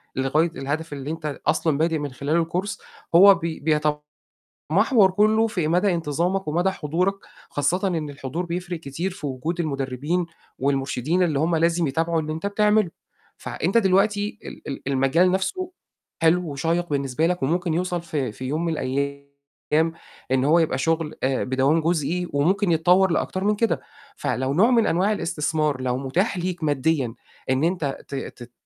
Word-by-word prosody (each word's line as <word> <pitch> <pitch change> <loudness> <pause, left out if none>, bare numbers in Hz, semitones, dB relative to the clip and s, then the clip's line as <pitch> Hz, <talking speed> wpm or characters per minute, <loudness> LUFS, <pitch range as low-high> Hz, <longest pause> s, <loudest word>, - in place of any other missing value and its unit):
لغاية 150 +6 +1
الهدف 145 +4 -3
اللي 140 +1 -5
أنت 160 -1 -6
ال 150 0 -3
أصلًا 160 -1 +1
بادئ 160 +1 +1
من 145 -2 -4
خلال 155 +5 0
course، 200 +2 -2 0.4
هو 195 +2 +9
بي 165 -2 -4
بيتمحوَر 150 -1 -1 0.9
كلّه 215 +3 +3
في 175 -7 -1
مدى 180 +4 +2
انتظامك 170 +3 -1
ومدى 175 +5 +1
حضورك، 180 +3 -1 0.3
خاصةً 175 +7 0
إن 160 -5 -2
الحضور 140 +5 -4
بيفرِق 175 0 -4
كتير 165 +6 -4
في 175 -6 -6
وجود 155 +7 -3
المدربين 145 +3 -1 0.3
والمرشدين 135 +5 0
اللي 155 -5 +1
هُم 165 +3 +1
لازم 170 0 +2
يتابعوا 165 +4 0
اللي 155 0 -4
أنت 160 +4 -5
بتعمله. 210 -1 +2 0.5
فع - - -7
أنت 190 +8 +3
دلوقتي 205 +1 +2
ال - - -10
ال 140 - -5
المجال 140 +7 +3
نَفْسه 360 - -2 0.5
حلو 165 0 +3
وشَيّق 165 +5 -1
بالنسبة 140 +2 0
لك 180 -4 -1
وممكن 170 +4 0
يوصل 175 +1 -1
ف 165 -2 -10
في 130 -3 -2
يوم 155 +6 -1
من 165 - 0
الأيام 140 0 -2 1.0
إن 130 0 +2
هو 165 +3 +5
يبقى 160 - +1
شُغل 160 +1 0
آآ، 130 0 +1
بدوام 135 +5 +2
جُزئي 170 +2 0
وممكن 175 +7 +2
يتطوَّر 180 +3 +4
لأكتر 185 +2 -1
من 210 +1 +2
كده، 230 +1 0 0.3
فلو 130 +1 -1
نوع 210 - +4
من 230 -3 +4
أنواع 185 +5 +2
الإستثمار 155 -7 -1
لو 125 -1 -1
مُتاح 170 - 0
ليك 180 -1 -3
ماديًا، 140 -4 0 0.3
إن 130 +3 +1
أنت 165 -6 0
ت - - -6
ت 125 -2 -7
160 Hz, 165 wpm, -23 LUFS, 140-180 Hz, 1.0 s, هو